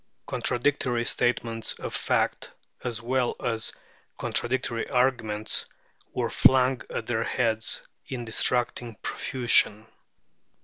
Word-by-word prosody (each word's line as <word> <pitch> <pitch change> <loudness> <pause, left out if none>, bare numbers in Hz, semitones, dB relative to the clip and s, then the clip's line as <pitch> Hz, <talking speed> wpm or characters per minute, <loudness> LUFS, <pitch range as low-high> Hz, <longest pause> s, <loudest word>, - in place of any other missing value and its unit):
Contradictory 125 -2 +1
statements 115 -1 0
of - - -6
fact, - - 0 0.3
as 120 -2 -3
well 125 0 +1
as 115 -2 -1 0.5
contradictory 120 -1 0
arguments, 120 -5 +1 0.4
were - - -1
flung 130 -1 +5
at 110 - -3
their 115 -1 0
heads 110 -3 0 0.2
in 120 -2 -4
distracting 120 0 0
profusion. 115 -4 +2
120 Hz, 95 wpm, -27 LUFS, 115-125 Hz, 0.5 s, flung